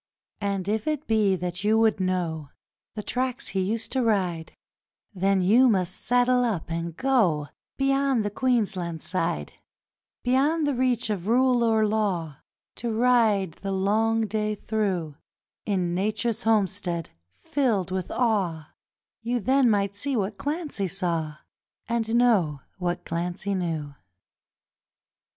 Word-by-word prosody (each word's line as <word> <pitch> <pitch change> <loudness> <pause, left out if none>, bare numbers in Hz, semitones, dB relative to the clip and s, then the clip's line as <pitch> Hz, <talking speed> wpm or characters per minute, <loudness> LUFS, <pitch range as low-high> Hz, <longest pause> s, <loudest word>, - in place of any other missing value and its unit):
And 200 -2 -2
if 215 +3 -1
it 305 -1 -1
be 215 -4 +2
that 180 +1 -4
you 215 +1 +3
would 220 -2 +3
know 175 -5 -2 0.5
The 210 - -4
tracks 255 +2 -2
he 195 - -1
used 215 +4 -2
to 260 - +1
ride, 185 -8 0 0.6
Then 195 0 +1
you 240 +7 +5
must 185 -4 +1
saddle 245 0 +2
up 195 -8 -2
and 165 0 -4
go 195 - +2 0.3
Beyond 275 -4 +2
the 205 - -1
Queensland 195 -9 0
side 165 - -2 0.7
Beyond 290 +6 +2
the 290 - +1
reach 245 -3 +1
of 195 -2 -3
rule 250 +1 +3
or 220 -1 +3
law, 190 -9 -1 0.4
To 235 -1 -2
ride 220 -5 +3
the 195 - -3
long 220 +4 +1
day 215 0 -1
through, 190 -9 -2 0.5
In 185 -4 0
Nature's 210 +4 -1
homestead 195 -6 0 0.2
filled 195 - -1
with 185 -1 -3
awe 185 -10 0 0.5
You 240 +1 -1
then 260 +3 +3
might 200 -2 +1
see 270 +7 -1
what 200 0 -1
Clancy 290 - -2
saw 165 -4 -2 0.5
And 230 -1 -1
know 195 - +3 0.2
what 175 -1 -2
Clancy 175 +4 -3
knew. 165 -6 -3
205 Hz, 130 wpm, -26 LUFS, 180-235 Hz, 0.7 s, you